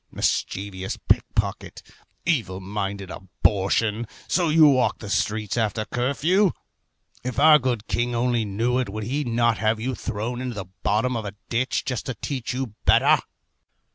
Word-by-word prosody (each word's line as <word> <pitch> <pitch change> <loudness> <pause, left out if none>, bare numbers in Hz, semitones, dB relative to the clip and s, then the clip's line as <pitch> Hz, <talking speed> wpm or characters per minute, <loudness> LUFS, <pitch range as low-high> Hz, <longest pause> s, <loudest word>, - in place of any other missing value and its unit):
Mischievous 95 -1 -2
pick - - +5
pocket, - - -2 0.4
evil 115 - 0
minded 100 0 -4
abortion, 105 +4 0 0.2
so 175 -2 +2
you 155 0 +7
walk 130 -3 +3
the 105 -3 -7
streets 105 0 -1
after 110 0 0
curfew? 155 - +1 0.7
If 125 0 -4
our 155 +1 +8
good 120 -6 -1
king 120 0 -1
only 120 -1 +1
knew 115 +5 0
it, 125 - -1
would 110 +2 -5
he 140 +7 -1
not 120 -2 +1
have 110 0 +1
you 130 +4 -2
thrown 115 +2 -4
into 125 -2 -4
the 100 -2 -5 0.2
bottom 115 +5 +1
of 110 -2 -3
a 100 0 -6
ditch, 125 +2 0
just 125 -3 -3
to 130 - -3
teach 130 +2 -4
you 125 -4 -3
better? - - +5
115 Hz, 160 wpm, -24 LUFS, 105-130 Hz, 0.7 s, our